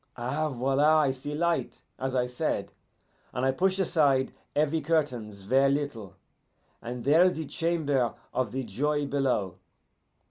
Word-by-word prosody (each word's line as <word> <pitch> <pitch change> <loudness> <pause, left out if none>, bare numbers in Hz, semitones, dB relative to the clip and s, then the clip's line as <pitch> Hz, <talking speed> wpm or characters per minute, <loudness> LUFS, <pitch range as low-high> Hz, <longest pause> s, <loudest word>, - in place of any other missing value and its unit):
Eh, 135 +6 -1
voila, 135 +3 +3
I 145 -3 +3
see 135 +3 -6
light, 170 +2 -1 0.2
as 130 0 -2
I 125 -1 +2
said, 125 0 -2 0.6
and 125 - -1
I 135 - +3
push 190 +7 +1
aside 145 -8 +2 0.2
heavy 155 +2 +1
curtains 125 -10 -1
ver' 135 +7 +3
little, 135 -9 -3 0.7
and 120 +1 -6
there 150 +7 +5
is 185 0 +3
the 160 - -4
Chamber 145 -7 0 0.2
of 125 -5 -1
the 130 +1 -3
Joy 145 +7 -1
below. 125 -10 -1
135 Hz, 145 wpm, -28 LUFS, 125-155 Hz, 0.7 s, there